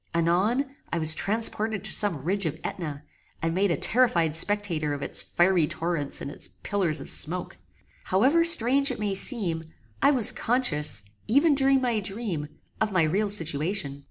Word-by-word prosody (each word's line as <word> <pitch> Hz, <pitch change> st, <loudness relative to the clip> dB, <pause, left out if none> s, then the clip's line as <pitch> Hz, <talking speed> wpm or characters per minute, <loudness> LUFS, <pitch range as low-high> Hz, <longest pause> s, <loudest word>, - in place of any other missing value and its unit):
Anon, 185 Hz, +11 st, +1 dB, 0.3 s
I -, -, -1 dB
was 155 Hz, -1 st, +4 dB
transported 215 Hz, +2 st, -1 dB
to 215 Hz, -, -2 dB
some 185 Hz, -11 st, +2 dB
ridge 190 Hz, +2 st, -1 dB
of 155 Hz, -, -4 dB
AEtna, 150 Hz, -5 st, -6 dB, 0.4 s
and 165 Hz, 0 st, -2 dB
made 195 Hz, +3 st, +1 dB
a 170 Hz, -, 0 dB
terrified 175 Hz, -, +2 dB
spectator 165 Hz, -5 st, -1 dB
of 140 Hz, -, -7 dB
its -, -, -2 dB
fiery 175 Hz, -3 st, +1 dB
torrents 165 Hz, -4 st, -3 dB
and 140 Hz, -, -6 dB
its -, -, -4 dB, 0.2 s
pillars 180 Hz, -7 st, 0 dB
of -, -, -4 dB
smoke. 175 Hz, +3 st, -2 dB, 0.5 s
However 265 Hz, -, +2 dB
strange 275 Hz, -4 st, +5 dB
it 255 Hz, -, -4 dB
may 205 Hz, -2 st, -2 dB
seem, 190 Hz, -6 st, -2 dB, 0.4 s
I 280 Hz, -, +5 dB
was 255 Hz, -7 st, +6 dB
conscious, 150 Hz, -, 0 dB, 0.2 s
even 290 Hz, +7 st, +3 dB
during 270 Hz, -1 st, +3 dB
my 240 Hz, -4 st, 0 dB
dream, 195 Hz, -6 st, -4 dB, 0.3 s
of 220 Hz, -1 st, 0 dB
my 185 Hz, -4 st, +2 dB
real 195 Hz, +7 st, 0 dB
situation. 165 Hz, -4 st, -1 dB
190 Hz, 165 wpm, -25 LUFS, 160-225 Hz, 0.5 s, was